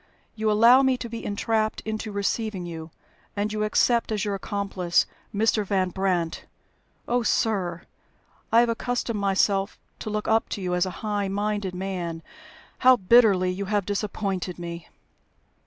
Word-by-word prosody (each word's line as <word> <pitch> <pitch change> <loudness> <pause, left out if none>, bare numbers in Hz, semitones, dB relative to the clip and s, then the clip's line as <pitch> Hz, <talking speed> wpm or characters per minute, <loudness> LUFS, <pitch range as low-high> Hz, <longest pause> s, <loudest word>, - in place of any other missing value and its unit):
You 220 0 0
allow 230 +5 +6
me 265 -1 +2
to 240 - -6
be 230 0 -7
entrapped 215 +1 -1
into 220 0 -4
receiving 200 -1 -2
you, 165 -1 -7 0.5
and 210 +1 -1
you 215 0 -1
accept 230 +2 +2
as 210 -2 -1
your 205 - -1
accomplice 195 -3 0 0.3
Mr. 215 +1 +2
Van 190 -2 0
Brandt! 180 -3 -1 0.6
Oh, 245 +1 +1
sir, 195 -6 0 0.7
I 230 +1 +6
have 240 - +2
accustomed 230 -1 -2
myself 195 0 +1 0.2
to - - -5
look 210 0 -3
up 225 0 +2
to 205 - -4
you 180 -1 -1
as 180 +1 +1
a 185 +4 -7
high 205 -2 -1
minded 205 -1 -2
man. 180 -3 -4 0.6
How 255 0 +7
bitterly 195 -4 +4
you 195 +2 -4
have 205 -1 0
disappointed 195 -3 -3
me!" 170 -1 -7
205 Hz, 155 wpm, -25 LUFS, 185-220 Hz, 0.7 s, How